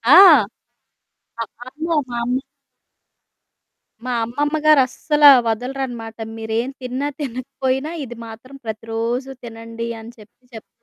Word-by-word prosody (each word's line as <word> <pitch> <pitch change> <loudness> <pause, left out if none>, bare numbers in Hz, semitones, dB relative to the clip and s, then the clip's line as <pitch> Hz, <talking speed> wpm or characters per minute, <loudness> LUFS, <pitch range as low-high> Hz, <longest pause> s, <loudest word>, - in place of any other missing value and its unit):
ఆ! - - +10 1.2
ఆ! - - +1 0.2
అమ్మో! 315 +5 -3 0.2
మామ్మీ 240 +2 -1 1.6
మా - - -2
అమ్మమ్మ 290 +6 -1
గారస్సలా 295 +1 +6 0.2
వదలరనమాట. 240 -1 -3 0.2
మీరేం, 225 +2 -2
తిన్నా 255 +3 -2
తినకపోయినా 265 +2 -2
ఇది 240 -2 -9
మాత్రం 230 +5 -11
ప్రతిరోజూ 230 +4 -3
తినండి 230 0 -6
అని 230 +2 -10
చెప్పి 215 +4 -18
చెప్తా 220 - -12
245 Hz, 100 wpm, -20 LUFS, 225-270 Hz, 1.6 s, ఆ